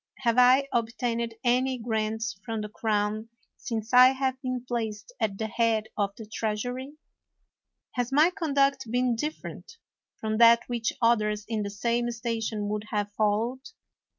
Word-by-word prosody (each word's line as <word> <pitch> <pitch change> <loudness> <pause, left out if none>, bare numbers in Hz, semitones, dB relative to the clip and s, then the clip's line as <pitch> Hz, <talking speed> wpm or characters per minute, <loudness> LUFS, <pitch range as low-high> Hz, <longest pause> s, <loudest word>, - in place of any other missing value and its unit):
Have 235 -1 +3
I 255 +3 +6
obtained 230 0 -1
any 255 +1 +2
grants 220 -1 -2
from 225 -2 -3
the 210 - -5
crown 215 +1 -1 0.3
since 225 0 -5
I 255 +1 +8
have 265 -1 -2
been 255 -2 -3
placed 225 - -4
at 200 -2 -1
the 220 - -2
head 225 -1 0
of 200 -2 +1
the 225 - -8
treasury? 245 +6 -3 1.0
Has 245 0 -2
my 305 +6 +5
conduct 275 - +1
been 245 0 +1
different 305 - -6 0.4
from 215 0 -2
that 235 0 +7
which 235 -2 -1
others 210 -2 +2
in 220 -1 -2
the 200 - -3
same 235 +4 -1
station 225 -2 -3
would 210 0 -3
have 205 -1 -2
followed? 220 +5 0
230 Hz, 150 wpm, -27 LUFS, 215-250 Hz, 1.0 s, I